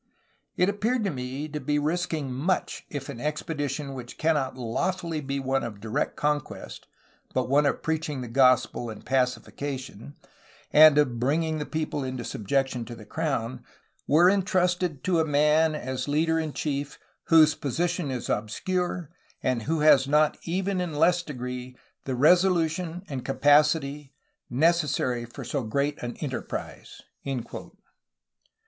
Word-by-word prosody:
It 180 - +4
appeared 220 +4 0
to 195 - 0
me 130 +2 -4
to 150 0 -4
be 150 0 0
risking 155 -3 -1
much 155 +9 -1
if 140 -3 -5
an 135 -5 -7
expedition 145 -2 -3
which 125 -2 -8
cannot 150 -5 0
lawfully 160 +7 -2
be 140 0 -3
one 135 0 0
of 110 -4 -6
direct 110 +1 -2
conquest, 150 -1 -3 0.5
but 130 -2 +1
one 145 +2 +4
of - - -1
preaching 155 -4 -2
the 125 - -5
gospel 125 -1 +3
and 110 - -9
pacification, 130 0 -2 0.6
and 155 -1 +8
of 130 -6 +2
bringing 155 +5 0
the 150 - -4
people 155 -2 -2
into 130 -2 -4
subjection 130 +3 -1
to 120 +1 -8
the 110 -2 -12
crown, 130 -4 -2 0.4
were 165 +5 +6
entrusted 180 -4 +1
to 180 -3 +2
a - - +4
man 150 +1 +3
as 130 -2 -4
leader 160 +3 +2
and 155 -2 -4
chief 145 -1 -3 0.3
whose 155 -2 +6
position 170 +3 -2
is 125 -2 -4
obscure 175 - -2 0.3
and 125 -2 +1
who 160 -1 +1
has 140 -3 +6
not 150 +1 +3
even 185 +2 -1
in 175 -3 -3
less 175 +3 +4
degree, 125 -4 -6 0.3
the 130 - -2
resolution 175 +3 +3
and 135 -3 -5
capacity 145 0 +2 0.3
necessary 140 -4 +1
for 120 +3 -9
so 135 +3 -2
great 140 +6 -1
an 120 0 -5
enterprise." 130 - -6
145 Hz, 140 wpm, -26 LUFS, 130-160 Hz, 0.6 s, and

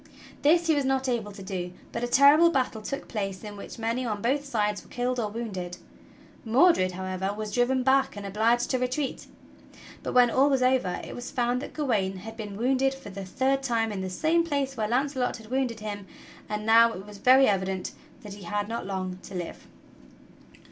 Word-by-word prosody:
This 335 +4 +4
he 325 - +3
was 290 -2 +1
not 265 0 0
able 230 -4 -1
to 195 -1 -10
do, 180 -2 -4 0.2
but 235 - -4
a - - 0
terrible 285 +6 +6
battle 255 -7 -1
took 275 +6 -5
place 195 -3 -4
in 210 -1 -7
which 200 - -9
many 230 +2 -1
on 215 -4 -2
both 265 +6 0
sides 210 -6 -1
were - - -20
killed 250 0 -1
or 215 -3 -1
wounded. 190 -6 -5 0.7
Mordred, 230 - +4
however, 185 +1 -3
was 215 0 -5
driven 250 +3 +2
back 265 -3 +2
and 205 - -6
obliged 225 +4 +1
to 255 - +1
retreat. 255 +3 -2 0.7
But - - -4
when 245 -1 +6
all 275 +4 +4
was 265 -2 +2
over 255 -8 +2
it - - -7
was 245 +1 -6
found 245 0 0
that - - -8
Gawain 210 -10 0
had 225 +4 -9
been 210 -3 -7
wounded 265 +3 +1
for 270 -7 -10
the 195 0 -7
third 265 +7 0
time 230 -4 0
in 195 -2 -4
the 190 - -3
same 320 - +2
place 280 -4 -1
where 215 -3 -1
Launcelot 260 +1 0
had 225 0 -14
wounded 255 -4 -1
him; 205 -2 -6 0.4
and 210 0 -3
now 230 +1 +6
it 190 - -8
was 205 -1 -11
very 260 +5 +6
evident 190 -3 0 0.3
that 205 -2 -8
he 200 -2 -10
had 205 +3 -2
not 230 -2 -4
long 185 -1 -4
to - - -10
live. 175 -2 -6
230 Hz, 205 wpm, -27 LUFS, 205-265 Hz, 0.7 s, terrible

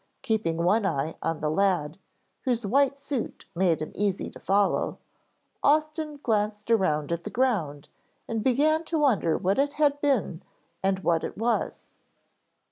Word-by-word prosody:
Keeping 220 -10 0
one 185 +7 +2
eye 160 -4 -1
on 165 -1 -2
the 150 - 0
lad, 180 -3 +1 0.4
whose 240 -3 -1
white 275 +6 +2
suit 275 -3 -5
made 170 -3 +1
him - - -7
easy 200 -2 -1
to - - -12
follow, 200 +1 +1 0.6
Austin 305 0 +1
glanced 210 -1 0
around 160 -9 +2
at 170 0 -2
the - - -5
ground 195 - -1 0.4
and 225 -2 -2
began 300 +6 +3
to 325 - -1
wonder 235 - +2
what 195 +6 0
it 285 +1 +1
had 290 -1 +2
been 250 - 0 0.4
and 190 -1 0
what 165 -1 +2
it - - -5
was. 230 +2 -1
210 Hz, 150 wpm, -27 LUFS, 170-275 Hz, 0.6 s, began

